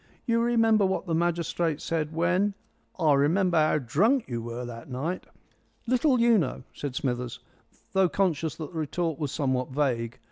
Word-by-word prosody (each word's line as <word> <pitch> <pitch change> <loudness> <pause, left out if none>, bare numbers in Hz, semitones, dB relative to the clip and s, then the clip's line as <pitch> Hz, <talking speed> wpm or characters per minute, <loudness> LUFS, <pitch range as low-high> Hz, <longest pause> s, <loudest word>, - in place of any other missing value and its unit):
You 230 -1 +2
remember 225 -3 +3
what 190 0 0
the 170 - -2
magistrate 170 -1 0
said 160 -2 -2
when 180 +5 +1 0.2
" - - -42
"I 155 -4 +4
remember 170 +6 +2
how 155 0 +3
drunk 200 - +2
you 120 -2 -3
were 120 +2 -5
that 115 0 -9
night." 150 +8 -3 0.6
"Little 255 +2 +2
you 235 -2 +5
know!" 130 -6 -3
said 140 -3 -5
Smithers, 125 -2 -2 0.5
though 190 -2 +4
conscious 165 -5 0
that 155 -3 -7
the 160 - -3
retort 160 +1 -2
was 145 -4 -2
somewhat 130 -4 -1
vague. 125 -4 -1
160 Hz, 170 wpm, -27 LUFS, 135-190 Hz, 0.6 s, you